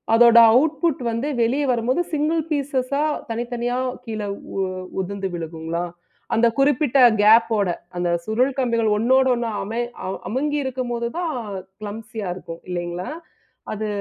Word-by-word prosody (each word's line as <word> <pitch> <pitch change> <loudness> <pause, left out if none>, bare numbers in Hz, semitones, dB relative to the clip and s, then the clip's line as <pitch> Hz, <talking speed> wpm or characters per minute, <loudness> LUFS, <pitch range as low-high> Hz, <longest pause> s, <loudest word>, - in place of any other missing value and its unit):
அதோட 235 0 +7 0.2
அவுட்புட் 300 +2 +2
வந்து 230 +5 -2 0.2
வெளிய 260 +6 +1
வரும்போது 250 +8 +1
சிங்கள் 310 +2 +1
பீசஸா 280 -1 0 0.3
தனித்தனியா 240 +1 -2 0.3
கீழே 215 -3 -4 0.3
உ 195 - 0 0.4
உதிர்ந்து 195 +1 -4
விழுங்குங்களா? 165 +1 -4 0.5
அந்த 235 +1 +4
குறிப்பிட்ட 275 -1 +3 0.2
கேப் 225 +2 +6
ஓட, 200 -3 +1 0.3
அந்த 175 0 0 0.2
சுருள் 245 +5 +1
கம்பிகள் 230 -4 +2
ஒண்ணோடு 260 +4 +4
ஒண்ணு 235 -1 -2
அமை 225 +4 -2 0.3
அவ் 190 - -4
அமுங்கியிருக்கும்போது 260 -3 -1
தான் 330 -5 -2 0.4
க்ளம்ப்சியா 215 -1 -6
இருக்கும். 170 -2 -9
இல்லைங்களா? 175 0 -4 0.6
அது 215 0 -3
235 Hz, 125 wpm, -22 LUFS, 210-265 Hz, 0.6 s, அதோட